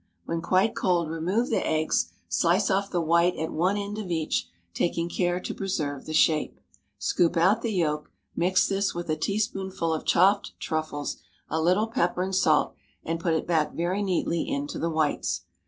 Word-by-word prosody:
When 165 0 -2
quite 190 +6 +2
cold 170 -4 +1
remove 185 +9 0
the - - +1
eggs; 155 - 0 0.2
slice 170 - +2
off 195 +1 +1
the 175 - 0
white 170 +2 +3
at 160 +1 -3
one 185 +5 +1
end 205 +1 -4
of 200 -4 -5
each, 155 - -1 0.3
taking 170 0 -1
care 175 0 0
to - - -5
preserve 150 -8 -3
the 155 - -4
shape. 155 -1 +2 0.4
Scoop 170 0 +1
out 195 +7 +4
the 230 - -1
yolk; 150 -6 -1 0.3
mix 185 +2 +3
this 195 -1 0
with 175 -2 -3
a - - +2
teaspoonful 190 -2 -1
of 155 - -3
chopped 195 +3 +3
truffles, 155 -2 -3 0.3
a 160 - 0
little 185 +6 +3
pepper 180 -6 0
and 190 +1 -3
salt, 160 -5 +3 0.3
and 165 +1 -2
put 165 -1 +1
it 160 - -1
back 160 -3 0
very 180 +4 -1
neatly 175 -3 0
into 285 0 -3
the 165 - 0
whites. 155 -2 0
175 Hz, 180 wpm, -26 LUFS, 160-195 Hz, 0.4 s, out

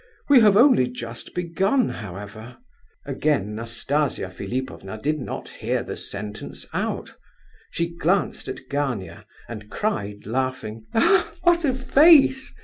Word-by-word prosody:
We 280 -3 +8
have 210 -3 +6
only 240 - +6
just 120 -2 -8
begun, 190 +8 +1
however—" 105 +3 -8 0.5
Again 135 -7 0
Nastasia 115 0 -2
Philipovna 110 0 -5
did 150 +5 -1
not 130 - -6
hear - - -2
the - - -6
sentence 105 +1 -5
out. - - -3 0.6
She 170 0 -2
glanced 180 +4 0
at - - -7
Gania, 125 - -3 0.2
and 105 -3 -8
cried, 105 - -3
laughing, 115 -2 -3 0.6
"What 345 -1 +4
a 260 -3 +1
face! 270 0 +5
130 Hz, 120 wpm, -23 LUFS, -, 0.6 s, We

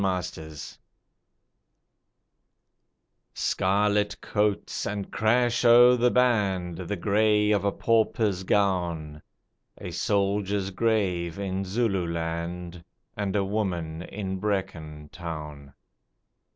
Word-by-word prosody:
Isandlwana 90 -5 -4 2.6
_Scarlet 105 +1 +1
coats, 105 -1 -1
and 100 -1 -4
crash 120 +2 +2
o' 120 +1 +7
the 125 0 +3
band, 100 -9 +1
The 95 +3 -3
grey 105 +2 +2
of 100 -1 +2
a 100 - +1
pauper's 110 -4 +1
gown, 85 -6 0 0.6
A - - -7
soldier's 100 -1 0
grave 95 -5 0
in 95 -1 -3
Zululand, 85 -4 -2 0.3
And 100 -2 -2
a 100 -1 +1
woman 90 -6 -2
in 95 0 -5
Brecon 85 -7 -3
Town. 75 -5 -7
95 Hz, 90 wpm, -26 LUFS, 85-105 Hz, 2.6 s, o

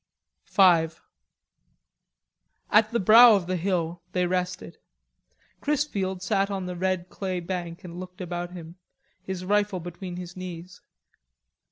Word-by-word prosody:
V 175 -5 +5 1.8
At 215 +1 +5
the 235 0 0
brow 225 +4 +8
of 195 -3 -1
the 185 +1 -2
hill 175 -1 -1
they 180 -1 +1
rested. 180 - -3 0.8
Chrisfield 200 -11 -1
sat 195 +1 +1
on 195 -2 -3
the 180 0 -5
red 185 0 -1
clay 185 -1 -3
bank 175 0 -5
and 175 -1 -8
looked 185 +1 -9
about 175 -1 -4
him, 170 0 -10 0.4
his 185 -1 -5
rifle 205 -1 +1
between 175 +1 -7
his 175 -1 -8
knees. 180 -1 -8
185 Hz, 130 wpm, -26 LUFS, 175-195 Hz, 1.8 s, brow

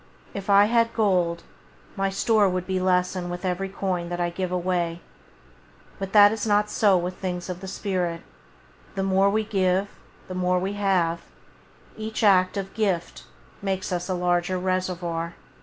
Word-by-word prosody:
If 200 0 -6
I 200 0 +7
had 230 +1 +2
gold, 180 -6 +1 0.5
my 195 0 0
store 205 +1 +3
would 185 0 -3
lessen 185 -1 0
with 175 +2 -5
every 185 +1 -1
coin 185 -3 -2
that 175 0 -4
I 175 0 0
give 185 +1 -3
away; 175 -2 -1 1.0
but 195 -1 -4
that 205 -1 +8
is 220 0 -3
not 210 0 +2
so 200 -4 +4
with 180 +1 -3
things 180 -1 -4
of 180 -1 -4
the 190 - -7
spirit; 180 -4 -2 0.7
the 195 - -1
more 195 +1 +3
we 215 +2 +1
give, 195 -2 +1 0.4
the 185 - -6
more 180 0 +1
we 190 +2 -2
have; 180 -5 +1 0.8
each 220 +1 -4
act 185 -2 +4
of 195 -1 -4
gift 195 -6 -2 0.4
makes 190 -2 -2
us 180 +1 -2
a 185 - 0
larger 175 +1 0
reservoir. 180 -2 -2
185 Hz, 160 wpm, -25 LUFS, 180-200 Hz, 1.0 s, that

